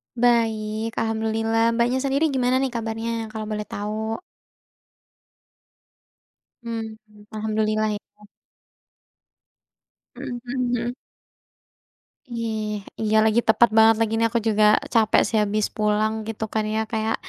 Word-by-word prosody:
Baik, 225 -2 +1
alhamdulillah. 225 +1 0
Mbaknya 240 +2 +1
sendiri 275 +3 +1
gimana 260 -1 +1
nih 270 - 0
kabarnya, 225 0 -3
kalau 215 -1 -5
boleh 210 0 -3
tahu? 215 +2 -3 2.5
Mhm, 225 -2 -5 0.4
alhamdulillah 215 0 0
ya. 210 0 -10 1.9
Mhm 255 -2 -5
hmm. 245 -1 -1 1.4
Eh, 225 -2 -2 0.4
iya 220 0 +1
lagi 220 +1 +3
tepat 235 +2 +6
banget 225 0 +7
lagi 225 -1 +1
nih 230 - +3
aku 235 +1 0
juga 215 -1 +3 0.3
capek 220 -1 +4
sih 225 - -1
habis 210 0 0
pulang 215 0 +1 0.2
gitu 220 0 -3
kan 220 -1 +1
ya 220 - +1
kayak 220 0 0
225 Hz, 110 wpm, -23 LUFS, 215-235 Hz, 2.5 s, banget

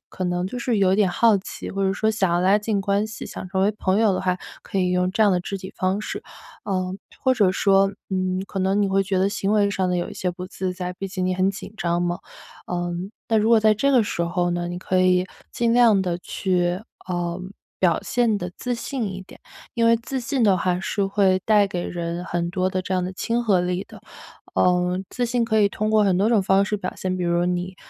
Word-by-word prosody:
可 - - -7
能 180 0 -1
就 245 +6 -5
是 240 -1 0
有 190 -1 +4
点 205 -1 +3
好 220 +3 +4
奇， 190 - -7
或 195 - -2
者 190 - +1
说 220 +2 +1
想 195 -5 +1
要 175 - +2
拉 190 +3 +4
近 210 -1 -1
关 200 +2 +1
系， 220 - -8
想 - - -7
成 190 0 0
为 205 - +4
朋 190 +1 +1
友 220 -3 +4
的 - - -1
话， 185 -1 0 0.3
可 - - -6
以 180 -1 +1
用 180 0 +1
这 220 - +2
样 205 - +5
的 180 - +1
肢 195 +2 -4
体 190 0 -8
方 190 +2 0
式。 - - -5 0.4
呃， 185 -1 -2 0.3
或 260 - +4
者 205 -6 +3
说， 195 +1 +3 0.2
嗯， 185 0 -1
可 195 - -5
能 190 +2 +1
你 200 - +2
会 195 0 +2
觉 195 -1 -1
得 190 - +3
行 200 -1 -1
为 205 -1 +3
上 190 -2 0
的 180 - 0
有 175 - -2
一 - - -8
些 180 - -2
不 180 +1 -7
自 185 0 -3
在， 180 -1 -4
毕 195 +2 -5
竟 185 -1 -3
你 185 - 0
很 185 +1 +2
紧 200 +1 -9
张 170 0 0
嘛。 175 0 -1 0.5
嗯， 175 +1 -3 0.2
那 225 - +3
如 215 +1 +2
果 230 -1 +6
在 215 0 +5
这 275 +7 +1
个 255 -4 +5
时 205 - -3
候 175 +1 0
呢， 175 0 -2
你 175 - -4
可 185 0 0
以 185 0 +3 0.2
尽 235 -1 +1
量 230 -4 +5
地 175 -2 -2
去， 180 0 -1 0.3
呃， 175 0 -2 0.4
表 175 -3 +3
现 235 -4 +1
得 180 -2 -5
自 245 -1 -2
信 250 +1 -3
一 190 - -7
点， 185 - -16 0.3
因 230 -1 +2
为 230 - +5
自 260 +3 -4
信 250 +1 -1
的 195 -4 +5
话 180 0 0
是 200 +1 -1
会 195 -2 +2
带 210 -2 +5
给 180 -3 -4
人 170 0 -4
很 170 -1 -2
多 185 0 0
的 185 -1 -1
这 185 - -4
样 185 - +1
的 185 +1 -3
亲 235 +5 -1
和 200 -6 +3
力 180 +1 -1
的， - - -13 0.5
呃， 180 0 +2
自 245 - -1
信 240 0 0
可 220 -1 +1
以 205 - +4
通 215 +1 -2
过 215 -1 +4
很 190 -3 +2
多 205 - +3
种 225 -4 +3
方 195 0 +3
式 210 +2 -1
表 185 -2 -5
现， 185 -1 -2
比 180 - -2
如 170 0 +1
说 175 - +1
你 180 +1 -2
190 Hz, 270 characters per minute, -23 LUFS, 180-210 Hz, 0.5 s, 果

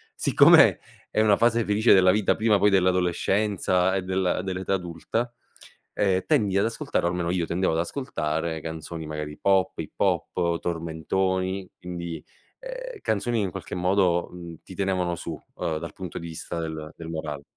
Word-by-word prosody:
siccome - - +6 0.3
è 110 - +2
una 105 -2 +4
fase 115 0 +3
felice 105 +3 +4
della 95 -1 +6
vita 105 0 +2
prima 110 -1 +3
poi 105 +2 +5
dell'adolescenza 95 0 +2
e 95 - 0
del 95 -1 0
dell'età 95 0 -2
adulta, 95 +7 -3 0.6
ehm, 95 -2 +1
tendi 105 -11 +2
ad 100 - +3
ascoltare, 115 -5 -1
o - - +3
almeno 85 -1 -2
io, 90 -1 0
tendevo 90 +1 0
ad 80 - 0
ascoltare 80 - -2
canzoni 80 0 -6
magari 75 -1 -5
pop, 95 -1 +2
hip - - -5
hop, 85 -2 +1
tormentoni, 95 +3 -2
quindi, 85 -3 -6 0.4
ehm, - - -7
canzoni 115 +3 0
che 105 - +1
in 95 - -2
qualche - - -7
modo, 90 -1 +2
mhmm, 85 -2 -9
ti 95 - -11
tenevano 90 -2 0
su, - - -6 0.2
ehm, 80 -2 -1
dal 85 +1 -7
punto 90 -2 -7
di 85 - -7
vista 80 +1 -6
del 80 -1 -5
del 80 - -8
morale. 80 -3 -5
90 Hz, 165 wpm, -25 LUFS, 85-100 Hz, 0.6 s, siccome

